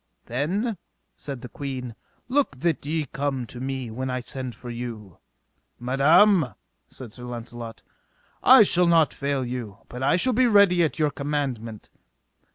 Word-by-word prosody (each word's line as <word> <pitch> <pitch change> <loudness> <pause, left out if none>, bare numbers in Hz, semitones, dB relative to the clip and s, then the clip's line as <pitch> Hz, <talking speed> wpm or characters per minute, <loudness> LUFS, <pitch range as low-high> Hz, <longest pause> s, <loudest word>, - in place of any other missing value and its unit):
Then, 185 - -1 0.4
said 135 -4 -7
the - - -7
queen, 130 -3 -6 0.3
look 260 - +1
that 170 -2 0
ye 155 0 -1
come 135 -2 -3
to 120 - -9
me 130 -2 -4
when 130 +3 -4
I 125 0 -1
send 125 0 -6
for 120 - -8
you. 115 -6 -7 0.6
Madam, 145 - +4 0.3
said 120 -5 -9
Launcelot, 120 -1 -8 0.6
I - - +8
shall 180 0 +4
not 165 -3 +4
fail 140 -2 -2
you, 120 -5 -5
but 125 - -7
I 135 - +3
shall 255 +8 +2
be 250 +2 +4
ready 200 -5 +5
at 160 - -1
your 150 -2 +1
commandment. 135 -7 -4
135 Hz, 150 wpm, -25 LUFS, 120-160 Hz, 0.6 s, I